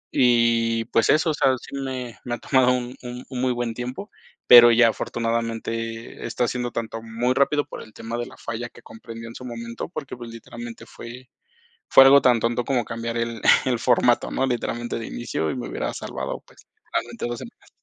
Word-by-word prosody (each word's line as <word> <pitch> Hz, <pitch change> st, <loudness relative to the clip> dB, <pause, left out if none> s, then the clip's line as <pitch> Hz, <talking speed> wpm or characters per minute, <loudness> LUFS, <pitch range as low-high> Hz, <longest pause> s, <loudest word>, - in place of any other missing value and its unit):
Y, 115 Hz, -2 st, +3 dB
pues, 115 Hz, -, +2 dB
eso, 160 Hz, +1 st, +4 dB
o -, -, -2 dB
sea, 135 Hz, -2 st, +3 dB
sí -, -, -10 dB
me 130 Hz, -3 st, -5 dB
me 120 Hz, -, -2 dB
ha -, -, -11 dB
tomado 130 Hz, -2 st, +3 dB
un 125 Hz, 0 st, -3 dB
un 125 Hz, 0 st, -7 dB
un 130 Hz, -2 st, -4 dB
muy 130 Hz, 0 st, +2 dB
buen 120 Hz, -1 st, -2 dB
tiempo, 125 Hz, -, -6 dB, 0.4 s
pero 120 Hz, -1 st, +10 dB
ya, 115 Hz, 0 st, +6 dB
afortunadamente, 115 Hz, 0 st, -3 dB
está 120 Hz, +1 st, -1 dB
siendo 125 Hz, 0 st, -3 dB
tanto 115 Hz, -1 st, -4 dB
muy 115 Hz, +3 st, -1 dB
rápido 145 Hz, +2 st, +2 dB
por -, -, -9 dB
el 110 Hz, -, -16 dB
tema 115 Hz, +2 st, -5 dB
de 120 Hz, -, -3 dB
la -, -, -13 dB
falla 115 Hz, +1 st, -5 dB
que -, -, -17 dB
comprendió 115 Hz, 0 st, -10 dB
en 115 Hz, -, -11 dB
su 125 Hz, -, -9 dB
momento, 115 Hz, +1 st, -6 dB
porque, 145 Hz, -7 st, -7 dB
pues, 120 Hz, -1 st, -9 dB
literalmente, 115 Hz, +1 st, -9 dB
fue 125 Hz, +2 st, -11 dB, 0.6 s
fue 135 Hz, -, +9 dB
algo 140 Hz, +1 st, +8 dB
tan 125 Hz, -2 st, +4 dB
tonto 120 Hz, +2 st, 0 dB
como 130 Hz, -3 st, +1 dB
cambiar 115 Hz, +1 st, -4 dB
el 115 Hz, -1 st, -3 dB, 0.2 s
el 130 Hz, -2 st, +1 dB
formato, 120 Hz, 0 st, +3 dB
¿no? 135 Hz, -, 0 dB
Literalmente, 120 Hz, -1 st, -2 dB
de 115 Hz, -, -6 dB
inicio, 80 Hz, -9 st, -3 dB
y -, -, -4 dB
me 125 Hz, -, -5 dB
hubiera -, -, -3 dB
salvado, -, -, -5 dB
pues, -, -, -20 dB, 0.3 s
realmente, 120 Hz, 0 st, -2 dB
2 120 Hz, 0 st, -4 dB
semanas. -, -, -13 dB
120 Hz, 200 wpm, -23 LUFS, 115-125 Hz, 0.6 s, pero